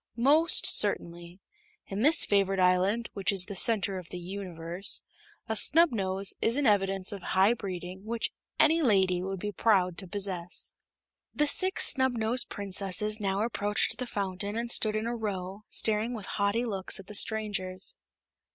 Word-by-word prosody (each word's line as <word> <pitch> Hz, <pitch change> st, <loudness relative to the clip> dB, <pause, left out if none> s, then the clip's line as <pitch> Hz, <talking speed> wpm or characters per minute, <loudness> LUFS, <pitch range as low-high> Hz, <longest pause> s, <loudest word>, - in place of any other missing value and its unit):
"Most 295 Hz, +7 st, +4 dB
certainly. 175 Hz, +2 st, 0 dB, 0.4 s
In 195 Hz, +2 st, -5 dB
this 310 Hz, +6 st, +5 dB
favored 195 Hz, -1 st, +1 dB
island, 185 Hz, +5 st, +1 dB
which 195 Hz, -1 st, -1 dB
is 190 Hz, -2 st, 0 dB
the 200 Hz, -, -8 dB
Center 200 Hz, -2 st, +2 dB
of 175 Hz, -, -13 dB
the 180 Hz, -, -7 dB
Universe, 180 Hz, -1 st, -4 dB, 0.4 s
a 220 Hz, -, -2 dB
snubnose 205 Hz, -, +1 dB
is 230 Hz, +4 st, +1 dB
an 290 Hz, -, 0 dB
evidence 195 Hz, -3 st, +1 dB
of 200 Hz, -2 st, -7 dB
high 190 Hz, +5 st, +2 dB
breeding 185 Hz, -3 st, -7 dB
which 230 Hz, +1 st, -3 dB, 0.3 s
any 315 Hz, +2 st, +4 dB
lady 190 Hz, -, +2 dB
would 190 Hz, 0 st, -5 dB
be 205 Hz, +3 st, -4 dB
proud 190 Hz, -5 st, +1 dB
to 190 Hz, -, -8 dB
possess." 185 Hz, -3 st, -2 dB, 0.6 s
The 295 Hz, -, +2 dB
Six 375 Hz, +6 st, +6 dB
Snubnosed 245 Hz, -2 st, 0 dB
Princesses 200 Hz, +2 st, -1 dB
now 195 Hz, +1 st, -1 dB
approached 210 Hz, +1 st, -1 dB
the 250 Hz, -, -4 dB
fountain 200 Hz, 0 st, -4 dB
and 235 Hz, +1 st, 0 dB
stood 215 Hz, -2 st, +3 dB
in 215 Hz, +1 st, -2 dB
a 235 Hz, +1 st, -3 dB
row, 200 Hz, -2 st, -6 dB
staring 220 Hz, +3 st, +1 dB
with 210 Hz, -4 st, -8 dB
haughty 205 Hz, +4 st, -1 dB
looks 195 Hz, -5 st, -2 dB
at 195 Hz, -, -11 dB
the 210 Hz, -, -11 dB
strangers. 200 Hz, -3 st, 0 dB
200 Hz, 160 wpm, -28 LUFS, 190-225 Hz, 0.6 s, Six